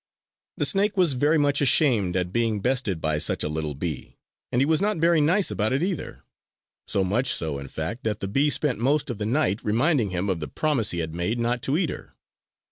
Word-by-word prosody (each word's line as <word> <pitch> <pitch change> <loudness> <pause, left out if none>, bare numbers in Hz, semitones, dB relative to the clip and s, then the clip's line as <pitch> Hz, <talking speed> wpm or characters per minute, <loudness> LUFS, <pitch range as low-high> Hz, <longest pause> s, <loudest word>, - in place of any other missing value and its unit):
The - - +1
snake 200 0 +1
was 175 -6 +3
very 145 +5 +2
much 145 -1 +2
ashamed 115 - +2
at 90 0 -2
being 115 -3 0
bested 120 -7 -1
by 80 -1 0
such - - 0
a - - -1
little 75 -1 -4
bee; 75 -1 -6 0.3
and 120 - +1
he 135 - +3
was 160 +3 +1
not 210 -1 0
very 165 0 +3
nice 180 +7 +2
about 110 +3 0
it 140 +5 0
either. 185 -2 -4 0.6
So 100 - +1
much 110 +8 0
so, 75 -4 0
in 70 - -8
fact, 80 - -5
that 105 -1 -1
the 100 - -4
bee 135 +9 +2
spent 145 -5 0
most 140 +3 +1
of 115 - -7
the 105 - -2
night 115 -5 0
reminding 120 - +1
him 90 +1 -2
of 95 -4 -1
the 75 - -5
promise 145 -9 0
he 85 - 0
had 80 - -10
made 90 +8 -2
not 120 +1 -1
to 135 +5 0
eat 180 -3 0
her. - - -10
120 Hz, 225 wpm, -24 LUFS, 95-150 Hz, 0.6 s, was